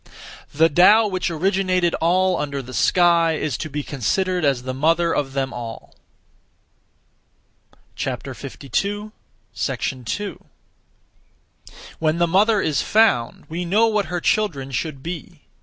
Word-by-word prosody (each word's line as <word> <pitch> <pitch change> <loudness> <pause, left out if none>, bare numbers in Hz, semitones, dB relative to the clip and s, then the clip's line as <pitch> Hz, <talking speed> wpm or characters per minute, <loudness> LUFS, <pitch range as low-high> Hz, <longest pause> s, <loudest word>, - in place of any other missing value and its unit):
(The 160 +3 +4
Tao) 185 +8 +6
which 185 -3 -2
originated 185 +1 +1
all 185 +2 +2
under 140 -2 -3
the 130 +1 -10
sky 170 0 +3
is 155 -4 -2
to 155 - -4
be 145 0 -4
considered 180 - -1
as 135 -4 +1
the 130 0 -4
mother 165 +5 +2
of 135 -2 -2
them 135 -1 -2
all. 115 -2 -8 2.0
2. 205 - -4 2.9
When 155 0 +1
the 170 0 +2
mother 205 +4 +3
is 150 -4 0
found, 215 - +2
we 170 +3 -4
know 205 +6 +3
what 210 -4 0
her 175 +2 -2
children 165 -10 0
should 135 +1 -4
be. 170 -2 -7
170 Hz, 120 wpm, -21 LUFS, 140-185 Hz, 2.9 s, Tao